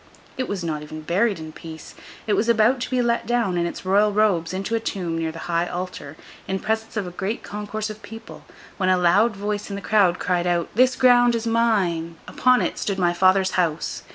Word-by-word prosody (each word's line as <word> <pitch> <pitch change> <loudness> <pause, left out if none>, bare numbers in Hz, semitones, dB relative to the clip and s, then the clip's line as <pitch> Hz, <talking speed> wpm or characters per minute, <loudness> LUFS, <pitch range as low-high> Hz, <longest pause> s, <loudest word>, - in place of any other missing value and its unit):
It 255 - -3
was 195 -3 -4
not 155 -3 -3
even 155 +1 -8
buried 195 +6 +1
in 160 -1 -8
peace. 160 0 -10 0.3
It 210 - 0
was 225 +3 +1
about 235 +3 +3
to - - -4
be 255 -1 +1
let 235 0 0
down, 235 -6 +1
in 170 0 0
its 170 - -7
Royal 205 +3 +3
robes, 200 -6 +1
into 195 +4 -4
a 230 - +2
tomb 185 -7 -3
near 165 -1 -2
the 160 - -10
high 170 0 0
altar, 175 -5 -6 0.3
in 190 - -1
presence 220 +2 -3
of 205 - -1
a 180 - -6
great 195 +5 -4
concourse 210 +1 -5
of 215 +1 -11
people, 225 +2 -11 0.3
when 185 -2 +1
a 185 - +4
loud 200 +6 +3
voice 205 +1 -3
in 200 - -4
the - - -4
crowd 200 -4 +2
cried 180 -1 0
out, 175 -1 0
'This 255 +3 +3
ground 245 -1 +5
is 230 0 -3
mine! 195 -8 +1
Upon 255 0 +3
it, - - -3
stood 200 -2 -2
my 175 -2 +2
father's 185 +1 +3
house. 165 -4 -1
195 Hz, 220 wpm, -23 LUFS, 175-225 Hz, 0.3 s, ground